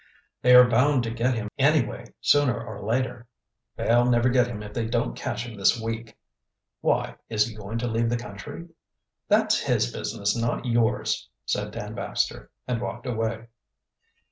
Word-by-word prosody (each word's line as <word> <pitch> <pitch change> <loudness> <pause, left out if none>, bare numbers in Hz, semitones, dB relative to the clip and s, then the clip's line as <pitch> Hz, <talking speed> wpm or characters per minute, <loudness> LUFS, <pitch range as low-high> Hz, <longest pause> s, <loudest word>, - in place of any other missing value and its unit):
"They 125 0 +6
are 125 0 +9
bound 125 +2 +3
to 115 - -3
get 120 +2 0
him 110 -2 -3
anyway, 140 -3 +2 0.2
sooner 145 -4 +3
or 110 -3 -8
later." 120 +1 -1 0.5
"They'll 120 +1 +3
never 120 0 +3
get 125 -1 +3
him 110 -3 -6
if 105 0 -9
they 115 -2 -2
don't 120 +1 -1
catch 120 -2 -4
him 120 -2 -8
this 100 +4 +3
week." 115 0 -5 0.6
"Why? - - 0
Is 105 -2 +2
he 115 - -7
going 105 +1 -6
to 120 +1 -2
leave 115 0 0
the 120 - 0
country?" 115 - -8 0.6
"That's - - +3
his - - 0
business, 100 0 -1
not 115 +2 -1
yours," 115 -2 0 0.2
said - - -1
Dan - - -6
Baxter, - - -2 0.2
and 120 -2 -1
walked 120 +2 -5
away. 115 -1 -3
115 Hz, 170 wpm, -25 LUFS, 110-125 Hz, 0.6 s, are